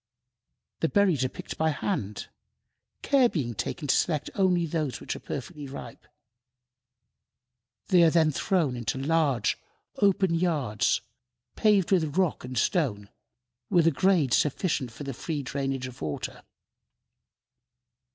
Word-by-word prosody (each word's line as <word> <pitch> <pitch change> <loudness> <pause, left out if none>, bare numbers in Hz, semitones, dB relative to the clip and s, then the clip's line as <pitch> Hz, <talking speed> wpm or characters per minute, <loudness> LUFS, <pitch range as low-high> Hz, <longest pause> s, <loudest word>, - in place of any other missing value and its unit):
The 160 - +1
berries 185 -10 +3
are 130 - 0
picked - - -8
by 160 0 +3
hand, 135 - -3 0.8
care 270 -4 +4
being 130 - -2
taken 145 +7 -4
to - - +3
select 150 -4 0
only 180 -3 +2
those 155 -4 -2
which - - -4
are - - -7
perfectly 145 +1 -6
ripe. 135 - -9 1.8
They 180 -2 +6
are 165 - +7
then 160 -1 +3
thrown 155 -3 0
into 120 +2 -2
large, 140 -5 +1 0.4
open 195 -3 +3
yards, 150 - +1 0.5
paved 205 -4 +3
with 165 -4 +1
rock 185 -4 +1
and 125 0 -6
stone, 110 - 0 0.6
with 175 -4 +4
a 165 - +5
grade 160 -5 +2
sufficient 145 -4 +1
for 115 - -9
the 135 -1 -4
free 145 +3 -4
drainage 135 0 -2
of 130 -1 -10
water. 75 -2 -4
155 Hz, 130 wpm, -27 LUFS, 130-175 Hz, 1.8 s, are